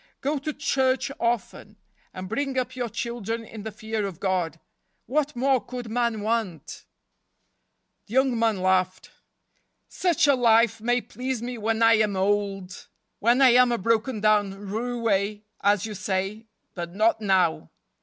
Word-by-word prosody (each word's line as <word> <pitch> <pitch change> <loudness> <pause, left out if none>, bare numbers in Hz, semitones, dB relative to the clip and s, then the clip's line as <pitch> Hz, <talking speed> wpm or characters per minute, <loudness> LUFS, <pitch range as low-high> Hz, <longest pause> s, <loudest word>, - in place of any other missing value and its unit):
Go 285 +2 -1
to 305 +3 -3
church 265 -2 0
often, 225 -2 -2 0.3
and 185 0 -7
bring 270 +5 -2
up 255 0 -2
your 245 -2 -3
children 230 0 -4
in 220 -1 -9
the 220 +1 -6
fear 215 0 -3
of 185 -4 -9
God. 180 -5 -1 0.5
What 295 +3 -1
more 260 -1 +2
could 245 -3 -7
man 235 -2 0
want? 215 -6 -3 0.6
" - - -50
The 215 - -11
young 265 -3 +3
man 220 -5 +1
laughed. 185 0 +1 0.4
" - - -43 0.2
Such 350 -6 +1
a 285 - +5
life 230 -3 +3
may 245 +2 +1
please 255 -1 -4
me 245 -1 -5
when 225 +1 0
I 225 0 +6
am 210 -2 +1
old—when 200 +4 -1
I 260 - +8
am 250 0 +5
a 235 - +1
broken 225 +2 0
down 205 -2 +1
roue, 220 -3 -1 0.2
as 205 0 +2
you 215 - -5
say—but 195 -2 -5
not 220 +1 +2
now. 185 - +1
225 Hz, 155 wpm, -25 LUFS, 200-245 Hz, 0.6 s, I